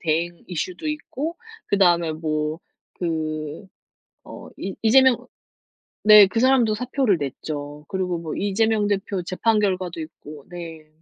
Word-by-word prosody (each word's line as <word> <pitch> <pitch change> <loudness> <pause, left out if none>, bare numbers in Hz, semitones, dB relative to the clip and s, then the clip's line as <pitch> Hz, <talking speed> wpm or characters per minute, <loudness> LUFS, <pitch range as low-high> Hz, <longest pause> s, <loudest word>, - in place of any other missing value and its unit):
대행 170 +1 -1
이슈도 180 - -4
있고 305 +1 -4 0.3
그 - - +1
다음에 175 -4 +3
뭐 155 0 -2 0.3
그 155 0 -3 0.6
어 - - -10
이 195 - -4
이재명 260 +2 +6 0.9
네 210 -1 +9
그 225 +4 -2
사람도 245 -3 +4
사표를 250 -3 +1
냈죠. 145 +1 -6
그리고 180 -2 -2
뭐 165 -2 -5
이재명 210 +2 +1
대표 195 -2 -2
재판 215 +5 +1
결과도 185 -4 -1
있고. 155 -2 -11
네. 165 -3 -9
180 Hz, 245 characters per minute, -23 LUFS, 160-215 Hz, 0.9 s, 네